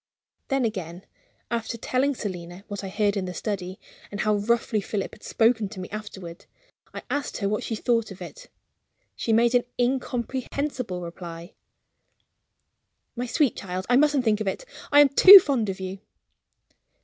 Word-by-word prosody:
Then 270 -3 +1
again, 185 -4 -5 0.5
after 235 0 -3
telling 265 +4 0
Selina 180 -3 -7
what 205 -1 -6
I 195 - -5
heard 205 +1 0
in 195 -2 -2
the 180 -1 -6
study, 190 -3 -4 0.3
and 205 - -4
how 215 -1 +2
roughly 220 0 0
Philip 200 0 -4
had 215 - -15
spoken 225 -3 +1
to 200 -2 -9
me 185 - -7
afterward, 190 -5 -8 0.4
I - - -8
asked 285 -1 -2
her 200 - -1
what 210 +1 -1
she 225 - -3
thought 230 0 0
of 195 -1 -11
it. - - -10 0.7
She 230 - -2
made 235 +2 +3
an 245 -1 +4
incomprehensible 250 -3 -2
reply: 170 +1 -9 1.6
"My 245 +1 -3
sweet 265 +1 +1
child, 185 -1 -5
I - - +6
mustn't 290 -1 +3
think 220 -2 +1
of 215 - -3
it 195 - -3 0.3
I 290 0 +8
am 290 - +6
too 375 +9 +11
fond 270 - +2
of 190 - -4
you." 190 +1 -6
215 Hz, 165 wpm, -25 LUFS, 190-250 Hz, 1.6 s, too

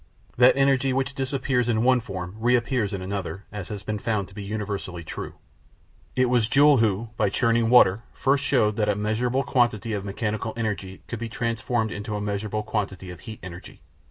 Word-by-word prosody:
That 125 +2 +6
energy 135 -1 +3
which 135 +1 -1
disappears 135 -2 0
in 110 -1 +2
one 130 0 +5
form 95 -6 -6
reappears 120 -1 +1
in 95 -2 -4
another 100 0 -4
has 105 0 -6
been 105 -1 -3
found 100 -3 -1
to - - -16
be 105 - -7
universally 100 -4 -4
true. - - -6 0.8
It 130 - +4
was 120 -3 +2
Joule 145 +2 +6
who, 110 0 +1
by 100 - +2
churning 115 +2 +2
water, 115 -4 +6
first 140 +1 +1
showed 115 -6 +2
that 105 -1 +1
a 105 - +2
measurable 115 +6 0
quantity 120 -5 +1
of 100 -2 -2
mechanical 110 +2 -3
energy 100 -4 -3
could 120 - -5
be 115 0 -4
transformed 115 -2 -1
into 105 +1 -4
a - - -2
measurable 105 +1 -2
quantity 100 -4 -3
of 90 - -10
heat 110 +4 -9
energy. 90 -1 -10
110 Hz, 185 wpm, -25 LUFS, 100-125 Hz, 0.8 s, That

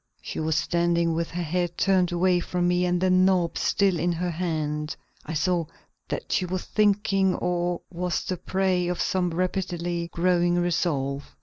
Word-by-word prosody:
She - - -6
was 160 0 0
standing 170 0 +1
with 165 +1 -2
her 175 +1 -3
head 175 +1 -2
turned 185 -2 +2
away 175 +1 +2
from 175 0 -1
me 180 0 +2
and 175 0 +1
the 185 +1 +2
knob 185 -2 +3
still 195 -4 +2
in 175 +3 +1
her 175 +1 -2
hand. 155 -3 -2 0.3
I 160 - -4
saw 175 +1 +1 0.4
that - - -5
she - - +2
was 185 +1 -3
thinking 200 -3 +2
or 175 0 -1
was 180 0 -2
the 185 - -3
prey 185 -1 0
of 180 0 -2
some 180 -2 +1
rapidly 175 -1 -2
growing 175 0 +2
resolve. 150 -6 -1
175 Hz, 170 wpm, -25 LUFS, 170-185 Hz, 0.4 s, knob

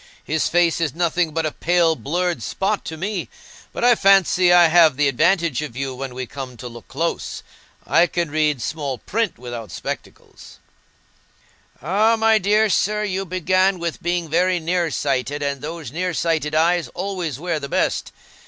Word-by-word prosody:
His 155 -1 0
face 170 -1 +2
is 155 -4 -1
nothing 170 -1 0
but 160 +1 -1
a 155 - -1
pale 170 0 +2
blurred 175 -1 -2
spot 195 - -2
to 160 - -6
me. 190 +1 -3 0.4
But - - -5
I 245 0 +6
fancy 195 -4 +4
I 175 -1 +7
have 160 -4 +5
the 145 -1 +3
advantage 165 +1 +1
of 135 -5 -7
you 135 -1 -3
when 130 -1 -6
we 130 0 -4
come 130 -2 -8
to 125 - -7
look 120 -1 -12
close. 160 +8 -3 0.4
I 170 +1 +4
can 170 -4 -2
read 150 -5 0
small 145 -5 -3
print 225 - -2
without 120 -3 -7
spectacles." - - -8 1.3
"Ah, 210 +7 +3
my 220 0 +4
dear 210 +3 +3
sir, 210 +2 +1
you 195 -1 -2
began 185 +1 +1
with 170 -2 -4
being 175 0 -1
very 180 +3 +1
near 170 +1 0
sighted, 140 0 -2
and 140 -2 -2
those 160 -3 -6
near 180 +2 -2
sighted 160 -2 -1
eyes 170 +2 +2
always 180 -7 -3
wear 165 0 -2
the 140 -1 -7
best. - - -1
170 Hz, 170 wpm, -21 LUFS, 145-185 Hz, 1.3 s, I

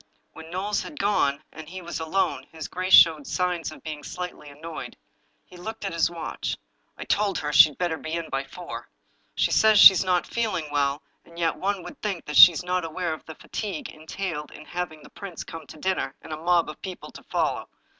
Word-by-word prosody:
When 160 0 -11
Knowles 200 +4 -1
had 300 - -9
gone, 155 -8 +1
and 155 0 -10
he 185 +1 -7
was 170 0 -5
alone, 160 +4 -1
his 160 -1 -7
grace 185 +1 +4
showed 155 -4 +6
signs 180 -3 -1
of - - -13
being 155 -2 -6
slightly 180 -2 -7
annoyed. 155 +3 -8 0.5
He 180 - -15
looked 220 +4 -6
at 195 - -3
his 170 0 +2
watch. 170 -2 -4 0.2
" - - -44
I - - -6
told 205 -1 +1
her 150 0 -3
she'd 150 0 +7
better 175 -3 -1
be 160 - -6
in 165 -1 -2
by 135 0 -3
four. 180 +4 -8 0.5
She - - +1
says 220 -1 +5
that - - +10
she's 190 -1 +10
not 180 -2 +1
feeling 185 -10 -2
well, 140 0 0 0.2
and 170 - -17
yet 165 -2 +1
one 195 -1 -2
would 290 - -11
think 195 -5 -3
that 150 - -5
she - - +13
was 170 0 -5
not 180 0 -1
aware 165 +1 -3
of 155 - -9
the 160 - -9
fatigue 200 -7 -5
entailed 160 0 -5
in 150 - -12
having 165 -3 -5
the - - -15
prince 195 -5 -8
come 160 -3 -9
to - - -12
dinner, 185 -5 -1
and 160 - -7
a - - -4
mob 170 +1 +2
of 155 - -9
people 185 -2 -8
to - - -12
follow. - - -1
170 Hz, 220 wpm, -25 LUFS, 155-185 Hz, 0.5 s, she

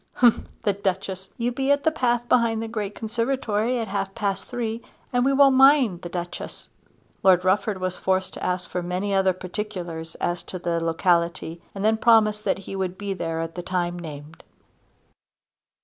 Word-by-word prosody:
"H'mh'm 240 -2 +4 0.2
the 205 -3 +2
Duchess! 190 -1 -3
You 240 0 0
be 270 +2 -1
at 285 0 +2
the 320 - +3
path 240 -5 0
behind 230 -2 +3
the - - -4
great 210 -3 -4
conservatory 230 0 -1
at 225 -2 -2
half 195 0 -3
past 195 -2 -2
three 230 -2 -3 0.3
and 245 0 +3
we 270 - +3
won't 275 -1 +6
mind 265 -9 +5
the 175 - -6
Duchess." 175 0 -6 0.5
Lord 185 -1 +5
Rufford 195 +1 +1
was 185 0 -2
forced 190 0 0
to - - -8
ask 180 0 -1
for 180 - -3
many 180 +3 -2
other 190 -1 +4
particulars 180 -3 -5
as 175 0 -2
to 185 - -4
the 170 -1 -1
locality 170 0 0
and 195 +1 -2
then 220 0 +4
promised 215 -2 +4
that - - +1
he - - -6
would 185 -1 -2
be 200 -1 -3
there 165 -3 -3
at 165 0 -4
the 175 - -5
time 175 -1 -2
named. 155 -1 -9
195 Hz, 180 wpm, -24 LUFS, 180-230 Hz, 0.5 s, won't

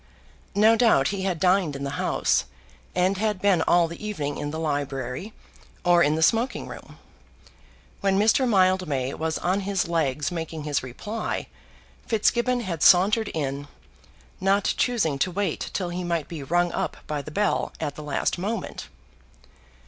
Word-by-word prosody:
No 215 +2 +6
doubt 225 - +4
he 200 -1 -3
had 180 -4 -1
dined 180 -4 +2
in 140 - -5
the 140 - -3
House, - - +1 0.5
and 185 +2 +2
had 210 -2 0
been 190 -4 +3
all 170 +1 +4
the 170 +5 -9
evening 150 -9 -3
in 145 - -3
the 155 - -5
library, 145 - -3 0.5
or 175 -1 +5
in 150 -1 +3
the 160 - +1
smoking 230 +8 +1
room. - - -11 1.0
When 195 -1 +1
Mr. 225 +5 +3
Mildmay 185 - +2
was 160 0 -2
on 185 +3 0
his 195 -2 -1
legs 150 -3 0
making 160 -2 -5
his 145 -2 0
reply, 205 - -4 0.6
Fitzgibbon 240 +3 +1
had 175 -8 -4
sauntered 205 +5 +5
in, 140 -2 -3 0.7
not 195 +1 +2
choosing 195 - +1
to 185 - +2
wait 190 -1 -2
till 180 -3 -2
he 180 +1 -4
might 170 -3 -1
be 165 -4 -7
rung 175 +5 +1
up - - -3
by 150 -1 -3
the 145 - -9
bell 205 +6 0
at 150 -3 -3
the 150 - -9
last 150 +3 -1
moment. 205 +2 -4
175 Hz, 160 wpm, -25 LUFS, 150-200 Hz, 1.0 s, No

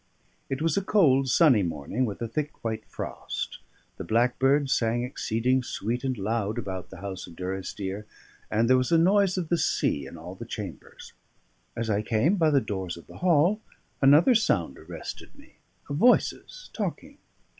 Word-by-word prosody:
It 135 +3 -2
was 165 -2 +2
a - - +3
cold, 140 -10 +3
sunny 130 -6 +5
morning, 85 - -2
with 105 +2 -5
a - - -2
thick 150 +6 -4
white 110 -1 -3
frost; - - -5 0.4
the - - -5
blackbirds 130 - +2
sang 115 +1 +1
exceeding 125 +1 0
sweet 120 0 -3
and 130 -2 -1
loud 105 +1 -1
about 95 -2 -5
the 95 -1 -11
house 95 -2 -6
of 85 - -13
Durrisdeer, 95 +2 -5 0.4
and 115 +2 +2
there 130 +1 +5
was 130 +3 0
a 165 - +6
noise 190 +2 +3
of 170 -4 -2
the 170 - +2
sea 70 -2 0
in 85 - -10
all 85 +3 -8
the 95 - -8
chambers. 105 -7 -8 0.6
As 115 0 -2
I 105 -1 +1
came 115 - +2
by 160 -3 +4
the 145 -2 +4
doors 95 -6 -4
of 85 - -13
the - - -13
hall, 180 +4 +3 0.4
another 145 - +6
sound 95 - +1
arrested - - -9
me - - -19 0.3
of 145 - -3
voices 250 - +2
talking. - - -5
120 Hz, 175 wpm, -27 LUFS, 100-150 Hz, 0.6 s, a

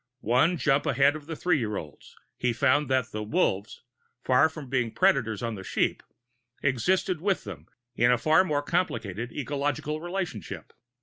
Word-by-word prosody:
One 135 +9 +3
jump 140 +2 +1
ahead 140 +1 +3
of 150 -1 -9
the 165 - -4
three 175 -1 +1
year 105 -4 -2
olds, 75 -3 -10 0.2
he 125 -1 0
found 140 +3 +2
that 130 -2 +1
the 110 - -4
"wolves," 105 - -1 0.4
far 130 +4 +4
from 155 -3 -9
being 125 -3 0
predators 115 -5 +2
on 115 -1 -2
the 95 -3 -7
"sheep," - - 0 0.6
existed 160 - +1
with 195 0 0
them 85 -7 -9 0.3
in 120 +1 +4
a 125 - +4
far 155 +8 +4
more 145 -5 -1
complicated 120 - -2
ecological 145 +2 -2
relationship. 175 - -5
135 Hz, 165 wpm, -27 LUFS, 115-155 Hz, 0.6 s, far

